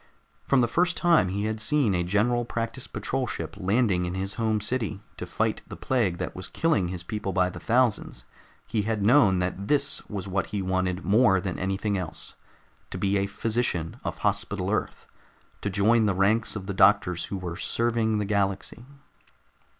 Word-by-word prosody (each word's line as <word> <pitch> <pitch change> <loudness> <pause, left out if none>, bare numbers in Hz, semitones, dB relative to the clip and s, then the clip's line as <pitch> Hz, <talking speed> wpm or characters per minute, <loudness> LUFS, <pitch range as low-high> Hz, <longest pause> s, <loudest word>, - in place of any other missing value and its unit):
From 135 -2 +3
the 120 - +3
first 175 +7 +1
time 170 - +4
he 100 +2 -2
had 110 0 -2
seen 135 -3 +2
a 90 - +1
General 110 +7 +1
Practice 115 +1 -4
Patrol 130 -1 -2
ship - - -5
landing 100 -2 +2
in 90 +1 -4
his 95 +1 -3
home 110 -1 0
city 110 -2 -2 0.2
to - - -6
fight - - -1
the - - -8
plague 110 -10 0
that - - -4
was 95 - -6
killing 135 - +1
his 90 -1 -5
people 100 +1 -4
by 90 0 +2
the - - -8
thousands, 115 - 0 0.4
he 110 - -1
had 105 -1 -1
known 110 -6 +5
that 90 +2 -2
this 140 -1 +2
was 100 -2 -5
what 95 0 -1
he 105 - -3
wanted 95 -1 -1
more 100 -2 +4
than 95 -1 -4
anything 95 +2 -1
else: 90 -3 -4 0.6
to - - -5
be 100 +1 0
a 100 - 0
physician 105 -6 -2
of - - -4
Hospital - - -1
Earth, - - -2 0.6
to 100 - -1
join 105 +3 +3
the 100 - +1
ranks 105 +4 +2
of 100 -3 -5
the 100 - -3
doctors 95 -3 +3
who 100 - -4
were 90 -2 -5
serving 115 +1 0
the 105 - -1
galaxy. 100 +4 -2
100 Hz, 185 wpm, -26 LUFS, 95-115 Hz, 0.6 s, known